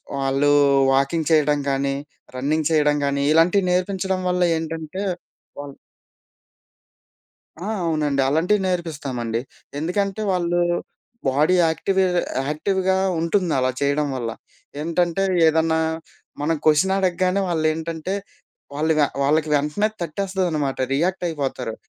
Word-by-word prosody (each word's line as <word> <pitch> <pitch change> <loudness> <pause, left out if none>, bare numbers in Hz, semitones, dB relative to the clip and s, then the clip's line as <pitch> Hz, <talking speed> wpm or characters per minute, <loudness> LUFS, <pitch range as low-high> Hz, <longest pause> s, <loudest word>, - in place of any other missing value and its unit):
వాళ్ళు 135 +1 +1 0.4
వాకింగ్ 140 +4 +1
చేయడం 150 -2 +3
కానీ, 135 0 0 0.4
రన్నింగ్ 150 +4 0
చేయడం 150 -2 +3
గానీ 140 0 0
ఇలాంటివి 175 +5 +4
నేర్పించడం 185 +1 0
వల్ల 180 0 +1
ఏంటంటే 160 +2 -5 0.6
వాళ్ 145 -1 -7 1.9
ఆ! - - -4 0.2
అవునండి. 150 -3 0
అలాంటివి 175 +8 +2
నేర్పిస్తామండి. 140 -10 -3 0.4
ఎందుకంటే 195 +6 -1
వాళ్ళు 175 -1 0 0.7
బాడీ 150 +7 +3
యాక్టివే 190 +4 +1 0.4
యాక్టివ్‌గా 190 +5 0 0.2
ఉంటుంది. 170 +1 0
అలా 130 0 +2
చేయడం 145 +1 +1
వల్ల. 120 -3 -3 0.5
ఏంటంటే 170 +3 0 0.2
ఏదన్నా 160 0 +2 0.6
మనం 160 +2 +1
క్వషన్ 155 +5 +4
అడగగానే 185 +1 +1
వాళ్ళు 160 -2 0
ఏంటంటే 165 +3 -4 0.6
వాళ్ళుగ 155 +1 +1 0.2
వాళ్ళకి 155 +2 +2
వెంటనే 150 +9 0
తట్టేస్తుందనమాట. 170 -5 -2 0.2
రియాక్ట్ 180 +5 0
అయిపోతారు. 135 -7 -3
160 Hz, 105 wpm, -22 LUFS, 145-180 Hz, 1.9 s, ఇలాంటివి